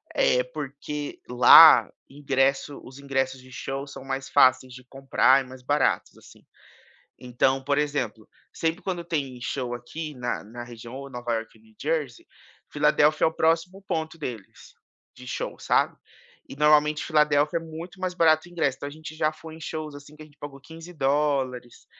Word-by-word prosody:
eh, - - +3
porque 145 - -6
lá 125 0 +9 0.2
ingresso 140 0 -1
os 130 +1 -13
ingressos 135 -1 -2
de 130 0 -16
show 135 +2 -5
são 140 -2 -10
mais 135 0 -4
fáceis 130 0 +4
de 125 +1 -12
comprar 135 -1 +3
e - - -15
mais 130 0 -12
baratos, 145 +1 0
assim. - - -18 0.7
Então, 130 +2 0
por 140 +1 0
exemplo, 130 -7 -2 0.3
sempre 165 +4 -2
quando 175 -3 -4
tem 140 -7 -3
show 125 0 -3
aqui 150 +6 -7
na 125 -5 -4
na 120 +3 -9
região 120 0 -11
ou 140 +1 -8
Nova 120 -2 -4
Iorque 115 0 -6
ou 110 - -25
New 110 0 -23
Jersey, 150 -5 -3 0.4
Filadélfia 150 0 +2
é - - +6
o 160 - -2
próximo 165 +5 0
ponto 160 0 -3
deles 120 -10 -9 0.4
de 125 0 -13
show, - - -5
sabe, - - +1 0.5
e - - -10
normalmente 150 0 +3
Filadélfia 150 0 +2
é - - -12
muito 165 +4 -9
mais 185 -1 -2
barato 160 -2 +3
ingresso, 145 -7 -1
então 145 - -6
a - - -7
gente 155 +1 -10
já 155 -1 +1
foi 160 0 -11
em - - -13
shows, 155 -2 -6
assim, 145 +1 -13
que 155 - -15
a - - -13
gente 145 -1 -23
pagou 145 -1 -8
$15. 140 -6 -2
145 Hz, 175 wpm, -25 LUFS, 130-155 Hz, 0.7 s, lá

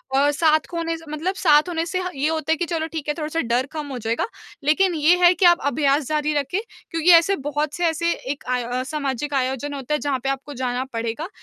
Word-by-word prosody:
और 285 +2 +4
साथ 310 +1 +3
खोने 330 -1 -2
से 325 - -14
मतलब 345 +6 -2
साथ 310 -2 +4
होने 330 -1 -1
से 370 +2 -2
ह 365 - -3
ये 280 +3 0
होता 320 -1 -1
है - - -2
कि 345 - -1
चलो, 325 -1 -2
ठीक 315 -2 -6
है, - - +2
थोड़ा-सा 310 +1 -2
डर 240 +2 0
कम 300 -2 -4
हो 255 - -4
जाएगा। 225 +1 -1 0.4
लेकिन 350 +4 +3
ये 320 +3 +4
है 350 - +7
कि 365 - +2
आप 345 -1 +6
अभ्यास 280 -1 +1
जारी 305 0 0
रखें 290 +6 0 0.3
क्योंकि 330 +1 +1
ऐसे 340 +4 +6
बहुत 295 +1 -1
से 350 - 0
ऐसे 335 +1 0 0.2
एक 290 - -17
आय 250 -1 0
अ, 250 +2 -2
सामाजिक 285 0 -3
आयोजन 265 +2 -1
होता 275 +1 -4
है, 300 - +1
जहाँ 270 0 -1
पे 270 - 0
आपको 275 +2 -4
जाना 250 0 -1
पड़ेगा। 230 +9 -3
300 Hz, 240 wpm, -22 LUFS, 275-330 Hz, 0.4 s, है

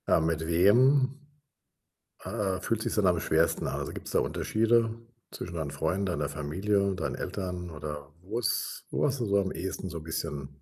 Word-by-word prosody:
Ah, - - +5
mit 80 0 0
wem 130 - +5 1.1
ah, 100 -4 -1
ah, - - -7
fühlt 115 -1 0
sich's - - -1
denn 105 -3 +3
am 90 -2 +3
schwersten 80 +1 +2
an? - - -2
Also, - - -4
gibt's - - -7
da - - +3
Unterschiede 115 +1 +2 0.4
zwischen 85 -1 -6
deinen 80 -4 -3
Freunden, 95 +7 0
deiner 75 -5 -1
Familie, 95 +7 0
deinen 85 - -2
Eltern 90 -2 -4
oder 75 -2 -6
wo 105 +6 -3
ist 120 - -1
wo - - +1
hast 140 -1 0
du 120 - 0
so 100 -1 +3
am 95 - -2
ehesten 95 +1 -4
so 85 -2 -6
bisschen, 75 -3 -5
90 Hz, 185 wpm, -29 LUFS, 80-105 Hz, 1.1 s, Ah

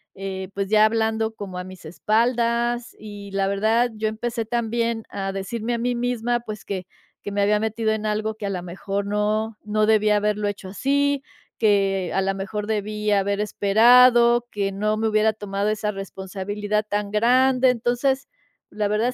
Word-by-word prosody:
eh, 190 -1 -5
pues 200 0 -2
ya 215 0 +5
hablando 220 0 +1
como 190 -4 -7
a - - -4
mis 185 -2 -12
espaldas 235 - 0
y 205 -2 -9
la 195 0 0
verdad, 220 +5 +2
yo 215 0 -1
empecé 230 +1 -3
también 230 0 -1
a 195 -1 -3
decirme 220 +5 -3
a - - 0
mí 245 +1 -1
misma 240 0 -1
pues 215 -3 -8
que 190 -2 -4 0.4
que 205 - -5
me 200 - 0
había 210 +1 +3
metido 220 0 0
en 215 0 -3
algo 215 +1 -1
que 210 -2 -5
a - - -2
la 185 -2 -3
mejor 195 +3 -4
no, 210 +2 -1
no 215 0 +1
debía 215 -1 +3
haberlo 210 0 0
hecho 200 -1 -7
así, 280 +6 0 0.3
que 195 -4 +2
a - - +1
la 195 0 0
mejor 200 +2 -4
debí 210 0 -2
haber 200 0 +1
esperado, 235 +4 +5
que 200 -1 -2
no 215 +2 0
me 220 +1 0
hubiera 215 0 +3
tomado 205 -1 -3
esa 215 0 -1
responsabilidad 200 +2 -4
tan 205 0 -2
grande, 255 +4 +4
entonces, 250 +3 0 0.5
la 210 -1 0
verdad 220 +4 0
215 Hz, 175 wpm, -23 LUFS, 200-230 Hz, 0.5 s, ya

